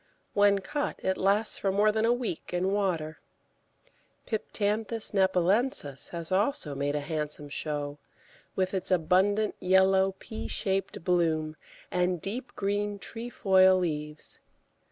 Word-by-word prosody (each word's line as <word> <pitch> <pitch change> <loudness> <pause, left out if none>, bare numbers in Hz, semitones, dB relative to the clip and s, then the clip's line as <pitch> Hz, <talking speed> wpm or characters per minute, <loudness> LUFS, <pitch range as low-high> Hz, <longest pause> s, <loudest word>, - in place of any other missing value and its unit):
When 205 0 +4
cut, 290 +8 -2
it 190 - +1
lasts 200 +4 +2
for 195 - 0
more 205 +2 +3
than 220 +1 +1
a 230 - +4
week 240 -8 -3
in 185 +2 +1
water. 175 -6 -1 1.1
Piptanthus 220 0 -1
nepalensis 190 - +1
has 170 0 -6
also 195 - 0
made 140 +1 -1
a - - +1
handsome 150 -1 -4
show, 145 0 -3 0.6
with 185 0 0
its 190 - 0
abundant 190 +4 +2
yellow, 190 +1 +4
pea 220 - -7
shaped 195 -3 -2
bloom 160 -3 +1 0.4
and 180 0 +1
deep 230 +10 -6
green 205 +1 -1
trefoil 195 -4 +3
leaves. 150 -3 -2
190 Hz, 125 wpm, -28 LUFS, 165-205 Hz, 1.1 s, When